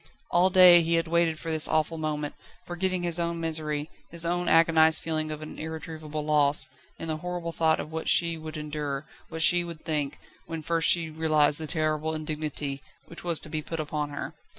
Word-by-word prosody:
All 180 +2 +4
day 180 -2 +8
he 165 +1 0
had 165 0 0
waited 165 -1 +1
for 165 - -5
this 155 -1 +4
awful 155 +1 0
moment, 150 -1 -3 0.3
forgetting 180 +1 -2
his 175 -1 +1
own 170 0 -2
misery, 155 -2 -1 0.2
his 170 0 -1
own 175 +1 0
agonised 160 -1 +5
feeling 155 -1 -1
of 155 0 -6
an 155 - -9
irretrievable 155 -1 -6
loss, 150 -1 +3 0.3
in 165 - -6
the 155 -1 -2
horrible 175 0 -5
thought 160 -1 +1
of 155 - -6
what 160 0 -3
she 170 -1 +4
would 155 0 -8
endure, 150 -2 -4 0.2
what 160 0 -1
she 175 +1 +5
would 170 -2 -8
think, 150 -3 -2 0.3
when 165 -1 -6
first 165 +1 +1
she 165 -2 +2
realised 155 -2 +2
the 160 - -5
terrible 155 0 -1
indignity, 150 -3 -4 0.2
which 170 - -11
was 170 -2 +1
to - - -5
be 155 0 -3
put 165 +2 -6
upon 150 -1 -3
her. 145 - -6
160 Hz, 195 wpm, -27 LUFS, 155-170 Hz, 0.3 s, day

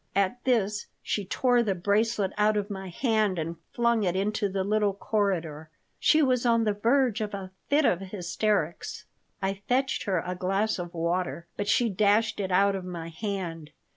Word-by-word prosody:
At 200 +5 +1
this 210 -5 +1 0.2
she 205 - -2
tore 245 +5 +2
the 205 -5 0
bracelet 205 +2 +1
out 210 0 +3
of 205 0 -2
my 190 -1 -5
hand 215 -1 +1
and 165 +1 -3
flung 235 -1 +2
it 180 -3 0
into 205 +1 0
the 190 0 -1
little 205 0 +1
corridor. 170 -8 -1 0.3
She 310 0 +4
was 255 -3 +2
on 230 -2 +3
the 210 -2 +1
verge 235 +2 +2
of 210 -1 -3
a 190 -1 -7 0.2
fit 290 +1 +4
of 180 - +3
hysterics. 190 -2 -2 0.4
I 195 +1 -1
fetched 265 +2 +1
her 190 -3 +1
a 180 - -2
glass 195 +4 0
of 175 0 -6
water, 170 +1 -1
but 205 - -3
she 235 +3 +3
dashed 210 +2 +2
it 190 -2 -1
out 195 +2 +4
of 190 - -4
my 170 -2 -6
hand. 170 -4 -4
200 Hz, 180 wpm, -27 LUFS, 185-220 Hz, 0.4 s, She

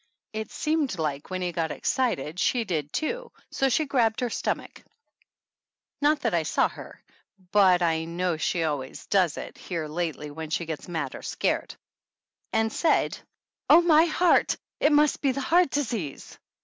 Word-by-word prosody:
It 220 0 -4
seemed 305 - -1
like 150 -3 -3
when 185 -1 -3
he 175 - -1
got 165 -1 -1
excited 180 - -1
she 240 +3 +2
did 155 -8 -3
too, 475 +10 -3 0.2
so 270 - +1
she 305 +5 +2
grabbed 235 -5 +1
her 245 -2 -1
stomach - - -3 1.2
(not 295 +1 +3
that - - 0
I - - +3
saw - - +1
her, - - -11 0.5
but 185 -3 +5
I 160 -1 +1
know 175 +1 -1
she 165 +2 -1
always 145 -4 -3
does 185 -6 +2
it - - -8
here 165 -4 -4
lately 155 -2 -3
when 160 +1 -7
she 165 +2 -1
gets 160 +1 -6
mad 160 -6 -3
or - - -8
scared) - - -2 0.8
and 220 0 +1
said: 325 - +2 0.5
"Oh, 345 - +8
my 325 -1 +6
heart! 345 +2 +3 0.2
It 295 - +4
must 295 0 +3
be 275 -2 +2
the 275 - -3
heart 345 +4 +3
disease 225 - -3
190 Hz, 165 wpm, -26 LUFS, -, 1.2 s, Oh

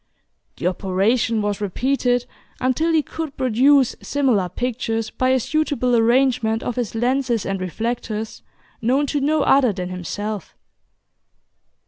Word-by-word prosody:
The - - -5
operation 205 +5 +1
was 205 0 -2
repeated, 245 +4 0 0.3
until 260 +6 +1
he 315 -2 +3
could 315 -2 -6
produce 260 +1 +3
similar 250 -10 +1
pictures 225 0 -2
by 255 - 0
a 260 0 +3
suitable 280 -3 0
arrangement 235 -1 +2
of 245 - -3
his 240 -3 -3
lenses 245 -1 0
and 195 -1 -2
reflectors 220 +3 -4 0.4
known 260 +6 +2
to 285 0 -1
no 300 +1 +2
other 270 -4 +4
than 180 -1 -5
himself. 195 +2 -5
240 Hz, 125 wpm, -21 LUFS, 215-265 Hz, 0.4 s, other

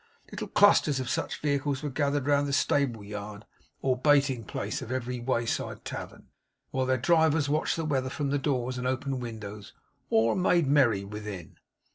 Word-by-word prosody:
Little - - -5
clusters 160 -9 +4
of 130 -1 -3
such - - -2
vehicles 140 -1 -1
were 145 - -3
gathered 140 0 0
round 145 0 +2
the 140 - -2
stable 135 -6 +1
yard 105 +1 -7 0.4
or 130 -1 +2
baiting 140 -2 +3
place - - -4
of 120 - -7
every 125 -1 -3
wayside 120 -1 -2
tavern; - - -7 0.4
while 130 -1 0
their 130 0 +2
drivers 160 +1 +3
watched 150 +2 +1
the 165 - -3
weather 135 -3 0
from 140 0 -2
the 145 - +1
doors 130 -3 -1
and 125 - -2
open 130 +1 -2
windows, 105 -4 -7 0.4
or 115 +1 +3
made 180 -3 +3
merry 130 -8 +3
within. 100 -4 -8
130 Hz, 170 wpm, -28 LUFS, 115-145 Hz, 0.4 s, clusters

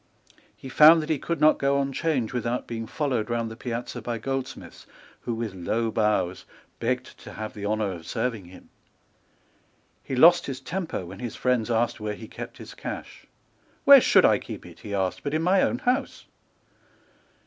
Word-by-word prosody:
He - - -10
found 155 +4 +7
that 155 - -3
he 150 - 0
could 170 +1 -3
not 155 +1 +5
go 140 0 +2
on 140 0 -1
Change 135 -7 -1
without 120 0 -2
being 115 -1 -5
followed 125 -6 -2
round 115 -1 -2
the - - -8
piazza 120 0 -5
by 120 -1 -3
goldsmiths, 135 +3 -6 0.3
who, 120 - -4
with 115 -3 -4
low 110 +5 -1
bows, 105 -5 0 0.4
begged 125 +2 -3
to - - -11
have 110 0 -6
the 100 -1 -5
honour 105 -1 0
of 85 -3 -9
serving 115 -4 -2
him. 90 +1 -15 1.3
He 130 - -4
lost 170 +7 +6
his 135 -2 -4
temper 165 - -4
when 95 +3 -10
his 120 -3 -5
friends 125 -3 0
asked 120 0 0
where 105 -1 -3
he 110 - -10
kept - - -9
his - - -10
cash. - - -8 0.6
"Where - - +10
should - - +5
I - - +4
keep - - -9
it," - - -13
he 100 -1 -5
asked, 95 -2 -1
"but 145 +1 -3
in 160 - 0
my 185 +2 +4
own 245 - +1
house?" 250 +3 -1
120 Hz, 185 wpm, -25 LUFS, 110-140 Hz, 1.3 s, Where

